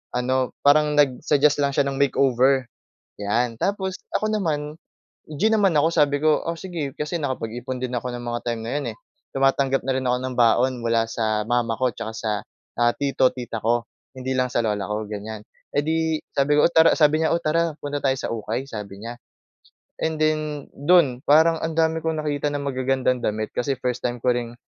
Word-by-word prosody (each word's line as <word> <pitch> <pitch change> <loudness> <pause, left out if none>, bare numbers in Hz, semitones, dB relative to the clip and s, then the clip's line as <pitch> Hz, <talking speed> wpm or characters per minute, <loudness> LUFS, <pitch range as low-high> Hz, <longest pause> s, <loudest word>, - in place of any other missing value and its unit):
Ano, 130 +1 0
parang 150 +1 +4
nag-suggest 145 +1 +3
lang 140 -1 +1
siya 145 - +3
ng 140 0 -3
makeover, 135 -1 +3 0.6
'yan. 115 +4 0
Tapos 190 -2 -1 0.2
ako 215 - -2
naman, 150 -6 -2 0.6
G 155 +8 +1
naman 200 -3 +4
ako, 160 - +4
sabi 145 -3 +3
ko, 155 -1 +3
"Oh, 165 0 -3
sige." 165 -7 -4
Kasi 150 +3 -2
nakapag-ipon 125 -1 -4
din 125 0 -4
ako 125 +1 -2
ng 120 - -6
mga 120 0 -2
time 115 -1 -4
na 115 - -3
'yon, 140 - -4
eh. - - -24 0.4
Tumatanggap 135 0 +2
na 135 - +1
rin 130 0 -2
ako 125 0 +2
ng 130 -1 -4
baon 120 +2 +4
mula 115 -1 +1
sa 110 -2 0
mama 120 -2 +1
ko 130 -1 +2
tsaka 110 - -6
sa, 110 -1 -3 0.5
ah, 120 0 +4
tito, 135 -2 +2
tita 120 -3 -5
ko, 115 +1 +1 0.3
hindi 130 0 -3
lang 130 0 +1
sa 120 - +1
lola 105 -2 -1
ko, 105 0 -2
ganyan. 105 +1 -6 0.3
Eh 145 - +2
'di, 160 0 0 0.2
sabi 140 +1 +2
ko, - - +6
"Oh, - - +1
tara", 160 0 +6
sabi 155 0 +4
niya, 160 - +2
"Oh, 170 - -1
tara 165 +1 +1
punta 145 0 -3
tayo 135 -1 +2
sa - - -4
ukay." 115 +4 -3
Sabi 100 -3 -7
niya 120 +1 -6 0.9
and 160 0 0
then, 155 -2 0
do’n, 145 -4 +3
parang 160 +2 +5
ang 160 0 -3
dami 160 0 +2
kong 160 -1 -1
nakita 145 -1 -1
na - - -3
magagandang 130 -2 0
damit, 110 0 -1
kasi 135 +3 -1
first 125 -2 -2
time 120 0 -1
ko 125 - +4
ring, 120 -1 -4
135 Hz, 200 wpm, -23 LUFS, 120-150 Hz, 0.9 s, ko